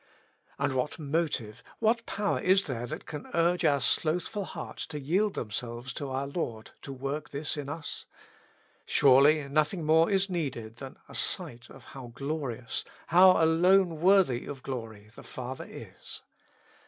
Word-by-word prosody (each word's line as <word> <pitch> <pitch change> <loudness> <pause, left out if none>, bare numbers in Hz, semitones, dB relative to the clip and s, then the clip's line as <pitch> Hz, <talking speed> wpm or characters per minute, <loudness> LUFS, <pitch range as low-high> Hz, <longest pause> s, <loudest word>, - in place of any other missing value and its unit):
And - - 0
what 130 +3 -1
motive, 145 -8 -2 0.2
what 230 +1 +1
power 205 0 -1
is 190 +2 +3
there 120 -3 -4
that - - -6
can 150 -2 -7
urge 170 +1 +2
our 140 -1 +4
slothful 170 - 0
hearts - - -7
to 150 -2 -6
yield 185 +9 +1
themselves 120 +3 -4
to 140 +1 -5
our 135 +1 -2
Lord 120 -7 -4
to 140 - -8
work 140 +2 -4
this 145 +3 -2
in 145 -2 -5
us? 150 0 -5 0.8
Surely 140 +2 +5
nothing 155 +4 0
more 160 +2 +5
is 195 -1 +2
needed 130 - -4
than 135 +1 -9
a - - -13
sight 120 0 -3
of 135 - -14
how 135 -3 -10
glorious, 135 -5 -3 0.3
how 185 0 +7
alone 175 +1 +4
worthy 180 -10 +4
of 135 -2 -7
glory 110 -5 -6
the - - -12
Father 130 +1 -7
is. - - -9
145 Hz, 155 wpm, -29 LUFS, 130-170 Hz, 0.8 s, how